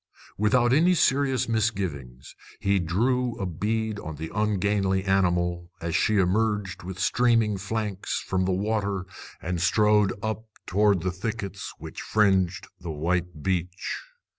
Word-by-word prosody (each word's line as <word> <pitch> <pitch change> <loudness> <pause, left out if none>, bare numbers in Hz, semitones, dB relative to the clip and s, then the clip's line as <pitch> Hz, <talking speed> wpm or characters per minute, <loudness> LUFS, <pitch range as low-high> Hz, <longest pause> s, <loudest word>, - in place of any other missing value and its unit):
Without 120 +4 +3
any 175 +6 +5
serious 135 -4 +2
misgivings, 90 - -2 0.3
he 100 0 +2
drew 120 +8 0
a 100 - -1
bead 105 +5 -2
on 80 -4 -6
the 80 +2 -6
ungainly 100 -2 +1
animal, 90 -3 +1
as 85 -1 -3
she 110 -1 +3
emerged 100 +1 +1
with 95 0 -7
streaming 115 +1 +2
flanks 100 0 -3
from 95 -1 -1
the 95 - +1
water 100 -1 -1 0.4
and 90 0 -2
strode 105 +1 +4
up 110 0 -3 0.2
toward 100 -2 +2
the 95 - 0
thickets 100 +1 -5
which - - -8
fringed 95 -4 +2
the 90 -2 -7
white 85 +1 -2
beach. 90 0 -2
100 Hz, 135 wpm, -26 LUFS, 90-110 Hz, 0.4 s, any